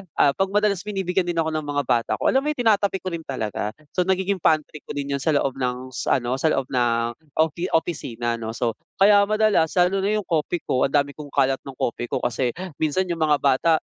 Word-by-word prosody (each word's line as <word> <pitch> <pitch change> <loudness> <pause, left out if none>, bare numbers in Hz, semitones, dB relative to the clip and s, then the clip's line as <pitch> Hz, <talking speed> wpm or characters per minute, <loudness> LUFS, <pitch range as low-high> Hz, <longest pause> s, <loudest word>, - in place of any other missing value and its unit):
ah, 140 - +4
'pag 195 - +3
madalas 205 -3 +2
binibigyan 190 -2 -1
din 175 - -1
ako 160 -1 0
ng 155 -1 -3
mga 145 0 0
bata 115 -1 0
ko, - - +1
alam 265 - +4
mo 290 - -5
yung 300 -5 -1
tinatabi 205 -3 +3
ko 185 - -3
rin 165 -1 -6
talaga. 110 -4 -3 0.2
So 180 0 0
nagiging 190 0 +1
pantry 155 -1 +1
ko - - -6
din 140 0 -3
yun 140 - 0
sa 150 +2 +1
loob 135 -1 0
ng 125 0 -3
s - - -5
ano, 130 0 +1
sa 160 - +2
loob 135 -3 +1
ng 120 -2 +1 0.2
ofi 160 +3 +1
opisina, 120 -8 -2
'no? 110 0 -5
So, 120 -2 0 0.2
kaya 200 0 +5
madalas 215 -7 +2
lalo 180 +2 +3
na 205 +2 +1
yung 210 - -1
Kopiko, 160 -5 0
ang 140 - -4
dami 140 0 +2
kong 150 0 -10
kalat 135 -1 +1
ng 135 - -8
Kopiko 120 0 -3
kasi 120 0 -1 0.2
minsan 155 +4 +1
yung 165 - -3
mga 150 -2 +3
bata, 140 +4 +2
155 Hz, 225 wpm, -23 LUFS, 130-185 Hz, 0.2 s, kaya